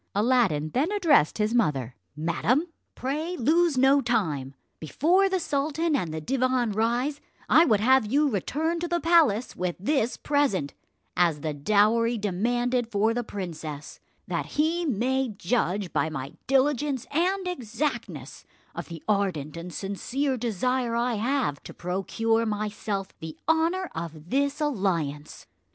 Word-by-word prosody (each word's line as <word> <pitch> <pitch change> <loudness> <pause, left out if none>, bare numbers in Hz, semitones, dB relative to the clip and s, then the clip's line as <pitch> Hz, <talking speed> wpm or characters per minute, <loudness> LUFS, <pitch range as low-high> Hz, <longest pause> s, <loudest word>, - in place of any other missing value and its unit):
Aladdin 205 - +2
then 295 +9 0
addressed 335 - +3
his 215 +1 0
mother: 135 - 0 0.2
"Madam, 170 - +1 0.3
pray 310 +7 -3
lose 315 +4 +2
no 270 +2 +5
time; 160 - -1 0.2
before 350 - +2
the 380 -1 0
sultan 305 +1 0
and 175 - -1
the 160 - -4
divan 255 - 0
rise, 240 +7 0 0.3
I 325 - +6
would 215 -8 +3
have 260 0 +4
you 295 +2 +3
return 305 - -1
to 345 - -2
the 345 0 0
palace 320 -10 +3
with 180 -1 -2
this 240 +2 0
present 270 - 0 0.4
as 170 -4 +2
the 155 0 -2
dowry 215 +9 +2
demanded 240 +4 0
for 215 +2 +2
the 240 +1 -2
princess, 160 -8 -7 0.3
that - - -2
he 330 +3 +1
may 260 +2 0
judge 195 -2 -1
by 160 - +1
my 140 -3 -6
diligence 270 0 +1
and 365 +5 0
exactness 230 - -4 0.3
of 170 - -6
the 165 -3 -9
ardent 185 -8 0
and 170 +2 -7
sincere 260 +10 -2
desire 240 +1 -1
I 240 +1 +1
have 230 - -1
to - - -11
procure 225 +6 0
myself 210 -2 -3
the 160 -1 -8
honour 330 +3 +1
of 165 0 -7
this 280 +2 +1
alliance." 170 - -2
230 Hz, 140 wpm, -26 LUFS, 180-280 Hz, 0.4 s, I